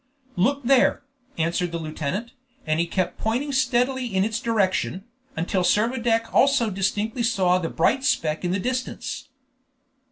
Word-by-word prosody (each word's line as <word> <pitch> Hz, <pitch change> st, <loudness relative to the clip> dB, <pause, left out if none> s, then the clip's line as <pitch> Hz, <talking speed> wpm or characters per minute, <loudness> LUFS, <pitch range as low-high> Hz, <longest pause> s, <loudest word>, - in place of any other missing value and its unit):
"Look 275 Hz, +10 st, +1 dB
there!" 260 Hz, +1 st, +3 dB, 0.3 s
answered 170 Hz, +2 st, 0 dB
the 170 Hz, -, -2 dB
lieutenant, 160 Hz, +8 st, -4 dB, 0.3 s
and 155 Hz, 0 st, 0 dB
he 170 Hz, -, +1 dB
kept 185 Hz, +1 st, -2 dB
pointing 250 Hz, +6 st, -1 dB
steadily 260 Hz, 0 st, +1 dB
in 190 Hz, -4 st, +1 dB
its 220 Hz, +2 st, -1 dB
direction, 200 Hz, -5 st, 0 dB, 0.3 s
until 180 Hz, +3 st, 0 dB
Servadac 230 Hz, +3 st, +1 dB
also 270 Hz, -5 st, +3 dB
distinctly 205 Hz, +5 st, -1 dB
saw 190 Hz, -6 st, +2 dB
the 165 Hz, -2 st, -3 dB
bright 260 Hz, +11 st, +1 dB
speck 160 Hz, -, 0 dB
in 175 Hz, -, 0 dB
the 185 Hz, +3 st, 0 dB
distance. 255 Hz, +4 st, -4 dB
215 Hz, 140 wpm, -24 LUFS, 180-250 Hz, 0.3 s, there